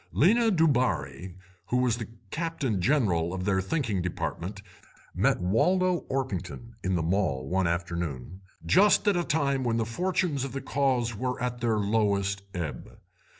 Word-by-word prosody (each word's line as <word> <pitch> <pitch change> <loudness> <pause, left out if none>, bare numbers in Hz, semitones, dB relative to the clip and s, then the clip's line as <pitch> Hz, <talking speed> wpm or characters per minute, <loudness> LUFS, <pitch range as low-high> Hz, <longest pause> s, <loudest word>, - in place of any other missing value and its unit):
Lena 225 - +4
Dubarri, 120 - +1 0.3
who 125 - +1
was 125 -2 +2
the 115 - -5 0.2
captain 155 - -2
general 95 - +1
of 90 -1 -4
their 95 -1 +2
thinking 105 - -1
department, 90 +2 -4 0.5
met - - +2
Waldo 180 - +2
Orpington 115 -3 -4
in 95 0 0
the 85 - 0
Mall 80 -7 0
one 95 +2 +1
afternoon, 85 -2 -3 0.2
just 205 +3 +4
at 205 - +4
a 175 - +1
time 140 -5 0
when 115 -2 0
the 115 - 0
fortunes 170 +2 -1
of 135 -2 -5
the 135 - -3
Cause 130 -4 0
were 125 +4 -2
at 125 -1 -3
their 115 -2 +1
lowest 100 -2 +1
ebb. 85 -5 -5
115 Hz, 150 wpm, -28 LUFS, 90-140 Hz, 0.5 s, Lena